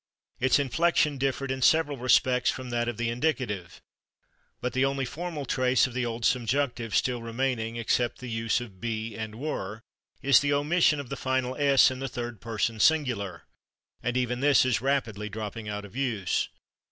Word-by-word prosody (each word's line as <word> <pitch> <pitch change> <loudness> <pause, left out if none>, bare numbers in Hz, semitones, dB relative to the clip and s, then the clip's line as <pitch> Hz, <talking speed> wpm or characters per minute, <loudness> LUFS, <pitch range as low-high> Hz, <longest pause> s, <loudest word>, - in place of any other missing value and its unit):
Its 130 0 +4
inflection 145 +1 +1
differed 135 0 -1
in 130 0 -3
several 150 +1 +4
respects 125 0 +3
from 130 -1 -4
that 120 0 0
of 120 -3 -3
the 120 0 -1
indicative. 120 - -2 0.8
But 125 - -3
the 130 - +2
only 135 0 0
formal 155 +2 -5
trace 130 -1 +2
of 130 - -5
the 125 -1 -1
old 115 0 -3
subjunctive 120 -2 0
still 125 -2 +1
remaining, 115 -1 -2
except 120 +1 0
the 130 - -8
use 115 -1 0
of 100 -6 -11
/be/ 110 -1 -3
and 110 -1 -5
/were/, 110 -6 -4 0.4
is 140 0 +6
the 145 0 +1
omission 150 +1 +3
of 140 -4 -7
the 140 - -3
final 130 -1 -1
/s/ 140 -1 +5
in 130 - -6
the 135 - -3
third 120 -3 -6
person 115 0 -2
singular. 125 - +1 0.6
And 120 +1 -1
even 125 -1 0
this 140 -1 +4
is 125 -3 +1
rapidly 115 -6 -1
dropping 105 +1 -6
out 105 0 -4
of 100 - -14
use.... 120 -9 -1
125 Hz, 175 wpm, -27 LUFS, 115-135 Hz, 0.8 s, is